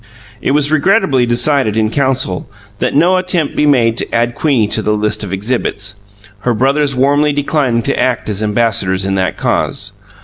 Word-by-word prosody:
It - - -1
was 145 +1 +2
regretfully 155 - +2
decided, 120 -2 +1
in 110 -1 +1
council, 130 -9 -1 0.3
that 125 - -1
no 175 +5 +4
attempt 180 -4 -1
be 150 - +2
made 120 -5 +2
to - - -2
add 120 +1 0
Queenie 130 -6 +1
to 110 - 0
the 105 0 0
list 105 0 -1
of 100 - -6
exhibits, 105 0 -3 0.5
her 120 +3 -1
brothers 140 +3 +1
warmly 145 +3 +2
declining 140 -5 0
to - - -1
act 125 -2 0
as 105 -1 -1
ambassadors 105 -4 0
in 95 - -1
that 95 -1 -1
cause. 100 0 -2
125 Hz, 175 wpm, -14 LUFS, 105-145 Hz, 0.5 s, no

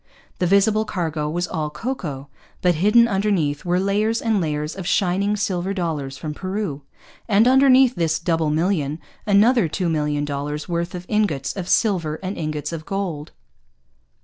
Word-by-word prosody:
The 180 - +1
visible 205 +3 +3
cargo 160 -7 -2
was 175 +3 -2
all 155 -3 -3
cocoa. 150 - -5 0.4
But 180 -1 +4
hidden 210 +8 +4
underneath 190 -8 0
were 175 +1 +1
layers 210 +4 +1
and 220 -4 +1
layers 150 -1 -2
of 190 -2 -6
shining 195 +3 +1
silver 195 -1 -2
dollars 150 -7 -3
from 150 +1 -5
Peru; 185 -4 -4 0.5
and, 215 +2 +4
underneath 260 -1 +6
this 165 -4 0
double 165 -2 0
million, 155 -2 0 0.3
another 210 +1 +4
two 175 +3 -2
million 150 -2 0
dollars' 145 +1 -4
worth 170 0 -2
of 180 0 -7
ingots 160 -11 0
of 185 -3 -5
silver 175 -9 +1
and 190 +2 -3
ingots 155 -1 -4
of 160 -1 -5
gold. 175 -6 -4
175 Hz, 155 wpm, -22 LUFS, 150-200 Hz, 0.5 s, underneath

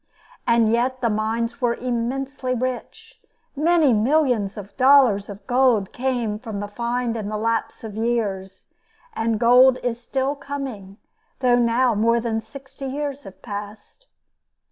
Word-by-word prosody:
And 230 -2 +4
yet 255 +2 0
the 235 -3 +1
mines 225 +3 -2
were 240 -1 +1
immensely 255 +2 -2
rich; 255 0 -5 0.3
many 310 -2 +3
millions 235 -3 +1
of 200 -1 -9
dollars 255 -7 +5
of 200 0 -10
gold 245 -5 +2
came 240 -5 -2
from 220 -4 -6
the 205 - -4
find 235 +2 -2
in 210 -2 -4
the 215 - -3
lapse 225 +1 -2
of 220 -2 -7
years, 215 -4 -2 0.5
and 225 - -1
gold 250 +2 +6
is 240 -1 -2
still 265 +3 -1
coming, 265 -9 -7 0.4
though 245 -1 +4
now 240 +1 +2
more 230 +3 +2
than 225 -1 -2
sixty 275 +4 -10
years 285 +1 -4
have 195 - -13
passed. 210 - -8
235 Hz, 145 wpm, -22 LUFS, 215-260 Hz, 0.5 s, gold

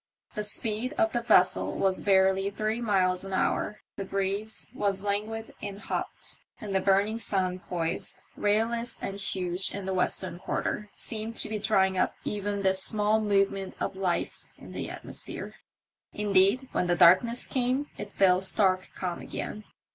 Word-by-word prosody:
The 210 - -1
speed 220 +4 -1
of 330 +1 +2
the 240 - 0
vessel 100 - +3
was 190 -1 +1
barely 190 0 +3
three 215 +3 -2
miles 185 -5 +2
an 195 0 -6
hour; 210 +2 0 0.2
the 195 - -3
breeze 195 +3 -3
was 195 -1 -1
languid 215 +2 -2
and 200 -1 -5
hot, - - -5 0.2
and 210 -4 -5
the 190 - +3
burning 200 +4 +2
sun 185 -4 -1
poised, 170 -2 -4
rayless 230 +3 0
and 195 0 -5
huge 185 -1 -1
in 200 -1 -5
the 190 - -2
western 180 -1 0
quarter, 210 +2 -3
seemed 225 0 -5
to - - 0
be 215 -1 -2
drying 190 -3 +3
up - - +1
even 205 -1 -2
this 190 0 +3
small 215 +1 +2
movement 195 -2 +1
of - - -2
life 185 -2 -2
in - - -12
the - - -4
atmosphere. - - -5 0.6
Indeed, 205 +5 +3
when 180 - 0
the 175 - +3
darkness 185 +9 +5
came 260 +3 0
it 205 -1 -6
fell 185 -1 +4
stark 190 -1 +3
calm 180 -2 -4
again. 215 0 -6
200 Hz, 160 wpm, -28 LUFS, 190-215 Hz, 0.6 s, darkness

